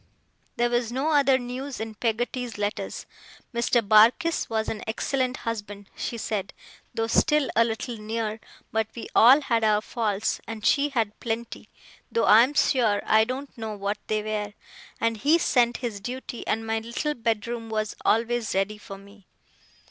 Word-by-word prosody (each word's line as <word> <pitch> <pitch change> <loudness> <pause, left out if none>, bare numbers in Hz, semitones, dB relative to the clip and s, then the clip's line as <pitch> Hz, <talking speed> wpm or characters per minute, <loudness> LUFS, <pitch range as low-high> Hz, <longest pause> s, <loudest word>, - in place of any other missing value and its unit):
There 240 0 +1
was 240 -1 0
no 270 +5 0
other 275 -3 +4
news 255 +2 -6
in 220 0 -5
Peggotty's 240 +1 -2
letters. 205 0 -3 0.5
Mr. 235 -2 +1
Barkis 230 +11 +4
was 220 -1 -1
an 215 - -3
excellent 255 +3 -1
husband, 205 -3 -5
she 235 - -4
said, 205 -3 -3 0.4
though 225 - -1
still 300 +3 +2
a 230 - +6
little 230 +1 -3
near; 220 0 -3 0.3
but 220 -1 0
we 235 - -7
all 260 +6 +7
had 230 -5 0
our 210 -1 +4
faults, 215 -2 -2
and 225 -1 -6
she 290 0 +3
had 225 -6 -2
plenty 230 0 -5 0.4
(though 460 - +2
I 215 +2 +8
am 265 +5 +1
sure 225 -9 +2
I 220 0 +4
don't 265 +4 -6
know 220 -2 -5
what 200 +1 -3
they 215 -1 0
were); 210 -1 -3 0.5
and 230 -1 0
he 295 +9 +4
sent 240 -7 +2
his 215 -4 -4
duty, 250 +2 -6
and 225 +1 -1
my 225 0 0
little 235 +7 -3
bedroom 230 -1 -2
was 215 -1 -2
always 230 -1 +1
ready 200 +2 0
for 195 -1 -9
me. 200 0 -17
225 Hz, 165 wpm, -26 LUFS, 215-245 Hz, 0.5 s, I